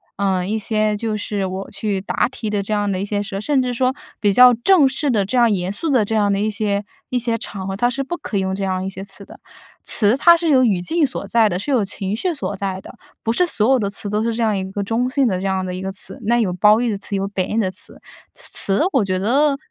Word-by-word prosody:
呃， 190 -2 0
一 220 +2 -1
些 215 0 0
就 220 0 -2
是 205 -2 -3
我 190 +1 -5
去 200 -1 -2
答 200 - 0
题 225 -4 -5
的 205 -1 -1
这 215 +2 -3
样 205 -1 0
的 185 -2 -1
一 - - -1
些 205 0 -2
社 195 -1 -5
甚 275 +3 +1
至 250 -1 -2
说 255 +1 +1 0.3
比 205 - +3
较 250 +4 +7
正 280 +5 +4
式 275 +2 -1
的 205 -4 +1
这 250 +6 -2
样 235 -2 +4
严 190 -1 -1
肃 325 - -2
的 250 -7 +3
这 220 - -2
样 205 -2 +2
的 195 - 0
一 215 +1 0
些 205 -1 -1 0.2
一 250 - 0
些 230 -1 -1
场 195 -3 -6
合， 195 - -3
它 240 +5 +1
是 270 +3 -3
不 285 +6 -4
可 205 - -4
以 - - +2
用 190 0 -1
这 195 - -4
样 185 -1 -1
一 - - -2
些 190 0 -8
词 200 0 -11
的。 - - -14 0.5
词 210 +1 +3
它 340 +5 +6
是 335 -1 -2
有 260 -3 +5
语 205 -7 +2
境 320 - +1
所 260 - -4
在 225 -2 +4
的， 180 0 -2
是 285 - -5
有 240 -6 +3
情 195 0 -3
绪 345 +9 -1
所 275 -8 -4
在 190 -1 -3
的， - - -12 0.3
不 225 - 0
是 360 - +3
所 240 -6 +1
有 265 - +5
的 200 -3 -1
词 200 0 -3
都 210 +1 0
是 230 0 0
这 235 - -3
样 215 -3 +1
一 190 0 -4
个 205 - -3
中 230 +5 0
性 270 -1 +2
的 190 - 0
这 195 - -4
样 190 -1 -1
的 180 - -4
一 185 - -6
个 190 0 -3
词， 195 - -6
那 235 +2 +2
有 195 -6 0
褒 210 +4 +5
义 240 0 0
的 205 - -2
词， 200 0 -5
有 195 0 -2
贬 190 -2 -3
义 225 - +1
的 190 -4 +1
词。 185 - -9 0.3
词 195 0 -1
我 265 -6 +3
觉 185 -1 -1
得， 270 +9 +3
很 275 - -1
210 Hz, 315 characters per minute, -20 LUFS, 195-245 Hz, 0.5 s, 较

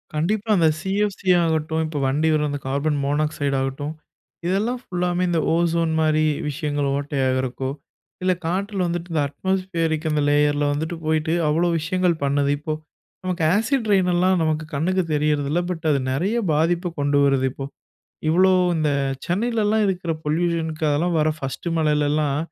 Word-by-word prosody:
கண்டிப்பா, 205 +8 -1
அந்த 165 -2 +4
சிஎஃப்சி 195 +1 -1
ஆகட்டும், 160 -1 0
இப்போ 155 -1 -5
வண்டி 145 +4 +1
வரும் 150 -1 +1
அந்த 145 0 -3
கார்பன் 140 +2 0
மோனாக்சைடு 145 -1 0
ஆகட்டும், 135 +3 -3 0.5
இதெல்லாம் 215 +7 0
ஃபுல்லாமே 180 -2 -1
இந்த 170 -1 +1
ஓசோன் 165 -1 +1
மாரி 155 0 +2 0.3
விஷயங்கள் 145 -1 -2
ஓட்டையாகிறக்கோ, 130 -2 -1 0.5
இல்ல 185 0 +3
காற்றுல 190 +2 -1
வந்துட்டு 175 +1 -4
இந்த 155 - +2
அட்மாஸ்பியரிருக் 165 -1 -1
அந்த 150 -1 +1
லேயர்ல 145 0 +2
வந்துட்டு 160 +4 -3
போயிட்டு 160 +1 +1
அவ்ளோ 165 +4 +2
விஷயங்கள் 180 +1 +1
பண்ணுது. 140 0 +1
இப்போ 155 +1 -3 0.5
நமக்கு 185 -2 -2
ஆசிட் 225 +1 0
ரெயின்லாம் 185 -1 +3
நமக்கு 155 0 0
கண்ணுக்கு 180 +6 +1
தெரியிறது 150 -1 +1
இல்ல. 170 - +2
பட் 165 -2 -5
அது 140 - +2
நெறைய 185 - 0 0.2
பாதிப்பு 170 +4 +1
கொண்டு 145 0 +2
வருது 135 -2 +2
இப்போ. 135 +1 -6 0.6
இவ்ளோ 185 +4 +4 0.2
இந்த 155 -2 +1 0.4
சென்னையிலலாம் 220 +2 +1
இருக்க்கூற 180 -4 -1
பொல்யூஷனுக்கு 160 0 -1
அதெல்லாம் 165 +4 +1
வர 155 0 +3
ஃபர்ஸ்ட்டு 155 +4 -4
மழையிலலாம் 150 -2 +1
160 Hz, 145 wpm, -22 LUFS, 145-180 Hz, 0.6 s, அந்த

